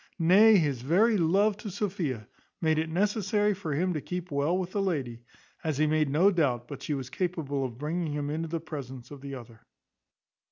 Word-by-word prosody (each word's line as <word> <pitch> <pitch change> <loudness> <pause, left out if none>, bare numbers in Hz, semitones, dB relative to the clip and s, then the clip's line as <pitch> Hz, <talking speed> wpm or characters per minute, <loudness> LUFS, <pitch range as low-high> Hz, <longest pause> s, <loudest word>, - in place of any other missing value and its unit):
Nay, 200 +6 +6
his 145 -8 0
very 195 - +3
love 195 +4 +3
to 210 0 -7
Sophia 180 - -3 0.3
made 160 -2 +2
it 160 0 -1
necessary 205 +3 +1
for 170 -7 -4
him 180 +4 +1
to 155 - -3
keep 180 +1 -5
well 145 +5 +1
with 185 -1 -3
the 200 - -1
lady, 135 -11 -2 0.4
as 155 -4 -1
he 155 - +3
made 155 -1 +2
no 170 +8 +4
doubt 130 - 0
but 140 - -8
she 150 - -2
was 130 -2 -6
capable 160 -7 -2
of 120 -3 -5
bringing 155 +3 -2
him 145 0 -2
into 165 +2 -2
the 165 +1 -3
presence 135 -6 -8
of 140 -2 -9
the 140 -1 -6
other. 115 -3 -12
160 Hz, 200 wpm, -28 LUFS, 140-185 Hz, 0.4 s, Nay